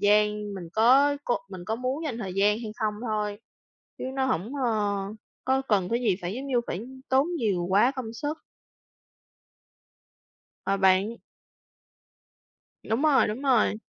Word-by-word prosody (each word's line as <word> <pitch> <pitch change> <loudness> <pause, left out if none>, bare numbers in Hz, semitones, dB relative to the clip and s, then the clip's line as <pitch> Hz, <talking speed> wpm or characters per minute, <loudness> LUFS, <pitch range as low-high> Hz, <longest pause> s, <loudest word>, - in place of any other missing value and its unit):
gian, 210 0 +2
mình 175 -3 -7
có 270 +6 +5
cô 240 - +1
mình 185 -2 -8
có 220 - 0
muốn 260 +6 -2
dành 245 -6 -3
thời 190 -4 -5
gian 205 +2 +3
hay 220 -3 -6
không 215 -1 0
thôi, 210 -1 -2 0.6
chứ - - -5
nó 265 -1 +1
hổng, 230 0 -1
ơ, 235 - +2 0.7
có 265 +1 +2
cần 195 -4 +2
cái 235 +1 0
gì 210 -7 +2
phải, 180 +4 -3
giống 270 +3 -5
như, 250 -3 +2
phải 175 - -3 0.3
tốn 265 +3 +4
nhiều 190 -7 0
quá 210 +7 +5
công 255 -5 -6
sức. 300 +6 -4 2.3
Ờ, 195 0 +1
bạn. 190 +4 +3 1.7
Đúng 225 +5 -1
rồi, 300 -7 +4
đúng 220 +6 -4
rồi. 255 -7 +3
220 Hz, 155 wpm, -27 LUFS, 205-260 Hz, 2.3 s, có